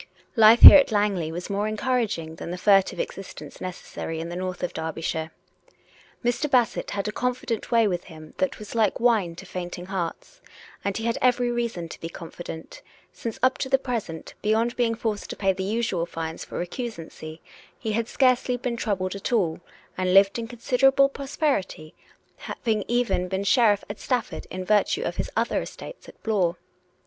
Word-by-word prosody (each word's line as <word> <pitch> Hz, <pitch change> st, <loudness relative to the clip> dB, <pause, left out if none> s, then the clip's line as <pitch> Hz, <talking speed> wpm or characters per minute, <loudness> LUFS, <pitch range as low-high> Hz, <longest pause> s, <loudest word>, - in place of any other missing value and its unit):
Life 225 Hz, 0 st, +7 dB
here -, -, +14 dB
at 275 Hz, -, +1 dB
Langley 200 Hz, -6 st, +1 dB
was 175 Hz, +2 st, -5 dB
more 205 Hz, +1 st, -1 dB
encouraging 215 Hz, -8 st, -1 dB
than -, -, -7 dB
the 180 Hz, -, -4 dB
fur 195 Hz, +1 st, +6 dB
tive -, -, -8 dB
existence 155 Hz, -6 st, -7 dB
necessary 175 Hz, -3 st, -6 dB
in 165 Hz, +1 st, -5 dB
the 175 Hz, -, -5 dB
north 185 Hz, 0 st, -4 dB
of 180 Hz, -, -2 dB
Derbyshire. 160 Hz, 0 st, -3 dB, 1.0 s
Mr. 245 Hz, +5 st, 0 dB
Bassett 245 Hz, -4 st, +2 dB
had 200 Hz, 0 st, -3 dB
a -, -, -1 dB
confident 250 Hz, -1 st, -2 dB
way 230 Hz, -2 st, +4 dB
with 180 Hz, -3 st, -2 dB
him 155 Hz, -3 st, -12 dB
that 185 Hz, -, -1 dB
was 210 Hz, -, -9 dB
like 220 Hz, -4 st, +1 dB
wine 220 Hz, -8 st, +2 dB
to -, -, -10 dB
fainting 175 Hz, 0 st, -6 dB
hearts, 190 Hz, -, -5 dB, 0.4 s
and 200 Hz, -1 st, -1 dB
he 225 Hz, -, -4 dB
had 235 Hz, 0 st, 0 dB
every 245 Hz, -1 st, +3 dB
reason 235 Hz, -8 st, -2 dB
to -, -, -10 dB
be 165 Hz, -, -6 dB
con 165 Hz, -1 st, -9 dB
fident; 165 Hz, -2 st, -9 dB, 0.3 s
since 230 Hz, -2 st, -5 dB
up 255 Hz, 0 st, +3 dB
to 265 Hz, -, -2 dB
the 270 Hz, -, +5 dB
present, 230 Hz, -11 st, -5 dB
beyond 225 Hz, +3 st, +1 dB
being 235 Hz, -2 st, +1 dB
forced 220 Hz, -3 st, -3 dB
to -, -, -5 dB
pay 195 Hz, -1 st, +1 dB
the 190 Hz, -, -5 dB
usual 195 Hz, -4 st, -1 dB
fines 165 Hz, -1 st, -5 dB
for -, -, -8 dB
recusancy, 170 Hz, -5 st, -6 dB, 0.4 s
he 220 Hz, -, -3 dB
had 230 Hz, +1 st, -1 dB
scarcely 255 Hz, -1 st, +2 dB
been 245 Hz, -1 st, -3 dB
troubled 190 Hz, -5 st, -2 dB
at 200 Hz, +3 st, -5 dB
all; 180 Hz, -9 st, +1 dB, 0.4 s
and 185 Hz, 0 st, +1 dB
lived 195 Hz, +3 st, +5 dB
in 230 Hz, -, -4 dB
considerable 265 Hz, +3 st, +3 dB
prosperity, 275 Hz, -, -2 dB, 0.4 s
having 215 Hz, -3 st, -2 dB
even 240 Hz, -7 st, +1 dB
been 190 Hz, +2 st, -2 dB
sheriff 210 Hz, -2 st, +4 dB
of 205 Hz, -, -7 dB
Stafford 250 Hz, -4 st, -2 dB
in 185 Hz, 0 st, -5 dB
virtue 210 Hz, -, +2 dB
of -, -, -3 dB
his -, -, -2 dB
other -, -, +1 dB
estates -, -, -10 dB
at -, -, -18 dB
Blore. 190 Hz, -6 st, +1 dB
210 Hz, 185 wpm, -25 LUFS, 180-240 Hz, 1.0 s, here